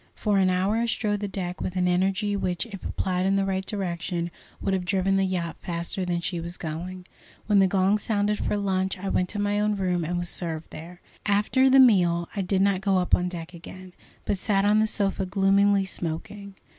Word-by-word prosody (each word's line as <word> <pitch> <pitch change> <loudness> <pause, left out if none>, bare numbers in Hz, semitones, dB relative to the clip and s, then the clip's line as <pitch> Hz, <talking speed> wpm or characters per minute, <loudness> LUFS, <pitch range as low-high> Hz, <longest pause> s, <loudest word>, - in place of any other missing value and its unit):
For 205 -2 +1
an 190 -1 +3
hour 190 +4 +1
I 235 +1 0
strode 210 -3 -1
the 205 - -3
deck 180 -2 -5
with 185 - -3
an 180 -1 +1
energy 195 +3 +1
which, 180 0 -1
if 200 -5 -9
applied 185 -1 -1
in 195 +1 +2
the 195 0 +1
right 190 0 -1
direction, 175 -3 -3 0.3
would 195 - -1
have 190 -1 0
driven 195 +1 +1
the 195 0 +2
yacht 175 -3 -3
faster 170 +2 -3
than 175 -1 -1
she 175 0 -3
was 170 +1 -6
going. 180 +3 -6 0.4
When 205 -2 +4
the 195 - +5
gong 195 +2 +2
sounded 210 -1 0
for 210 - -1
luncheon 190 -1 -1
I - - -1
went 180 -1 0
down - - -4
to 205 - -3
my 205 0 0
own 210 0 +1
room 180 -3 0
and 175 +2 -2
was 175 0 -2
served 165 -2 -2
there. 170 +3 -10 0.3
After 210 +6 +3
the 270 +1 +6
meal 175 -9 +4
I 200 - -1
did 190 +1 +1
not 195 -2 +2
go 195 -1 +2
up 180 -1 -1
on 180 0 +3
deck 170 -1 -7
again, 185 +2 -11 0.3
but 200 - -1
sat 195 -1 +1
on 210 +1 +4
the 220 - +3
sofa 200 -2 0
gloomily 195 +1 +3
smoking. 190 +3 -5
190 Hz, 220 wpm, -25 LUFS, 180-200 Hz, 0.4 s, the